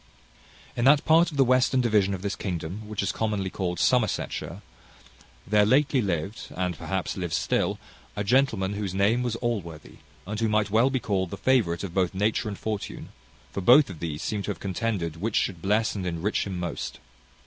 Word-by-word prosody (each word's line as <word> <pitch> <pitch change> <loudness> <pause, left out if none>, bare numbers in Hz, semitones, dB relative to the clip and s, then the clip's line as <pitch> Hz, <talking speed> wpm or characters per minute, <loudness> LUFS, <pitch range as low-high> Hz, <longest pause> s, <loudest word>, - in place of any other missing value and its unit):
In 120 - -1
that 145 +1 +5
part 165 +2 +5
of 150 - -8
the 135 - +6
western 130 +1 +3
division 105 -5 +2
of 95 - -9
this 100 -1 -2
kingdom 90 +3 -5
which 105 -2 -3
is - - 0
commonly 105 -4 -2
called 90 -2 -3
Somersetshire, 125 -4 0 0.8
there 105 +1 +4
lately 135 +4 +3
lived, 95 +1 -3
and 90 -1 -1
perhaps 95 +2 -3
lives 90 -4 -2
still, - - 0 0.4
a 105 - -2
gentleman 110 -4 +2
whose 100 -2 -4
name 105 +5 +2
was 120 -2 -1
Allworthy, 95 -11 -4 0.3
and 105 +3 -4
who 115 -1 +1
might 105 -1 +1
well 115 +5 +4
be 130 -1 0
called 95 -6 -1
the - - -6
favourite 100 -10 +1
of 95 -4 -5
both 95 0 0
nature 105 +3 0
and 100 -2 -4
fortune; 105 -2 -5 0.4
for 100 - -4
both 125 +4 +6
of 85 - -10
these 80 -2 -4
seem 105 -2 -2
to 100 - -5
have 105 - -3
contended 95 -5 -2
which 105 +5 -2
should 90 -4 0
bless 105 +4 +1
and 95 -3 -4
enrich 90 +5 -1
him 95 -2 -4
most. 85 -3 -4
105 Hz, 190 wpm, -26 LUFS, 95-115 Hz, 0.8 s, the